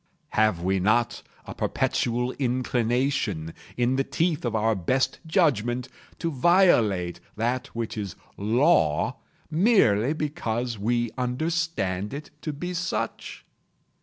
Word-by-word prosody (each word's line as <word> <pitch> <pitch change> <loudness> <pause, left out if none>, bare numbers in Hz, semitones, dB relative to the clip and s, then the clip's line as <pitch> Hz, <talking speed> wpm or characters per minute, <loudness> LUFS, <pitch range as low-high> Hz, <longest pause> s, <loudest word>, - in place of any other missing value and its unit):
Have 110 -6 +2
we 95 +1 +1
not 110 +5 +1 0.2
a - - -7
perpetual 125 +1 0
inclination, 120 - 0 0.2
in 125 +2 +2
the 135 - +2
teeth 155 +3 0
of 115 -2 -1
our 110 +1 +2
best 120 +8 0
judgment, 125 - +1 0.3
to 165 - -2
violate 125 - +3 0.2
that 120 +4 -1
which 115 0 -3
is 100 -4 -5 0.2
Law, 110 - +2 0.3
merely 155 - +4
because 120 -7 -2
we 120 +2 0
understand 125 - -1
it 150 +1 -8
to 155 - -3
be 175 +5 -5
such? 180 +1 -3
120 Hz, 115 wpm, -26 LUFS, 110-150 Hz, 0.3 s, merely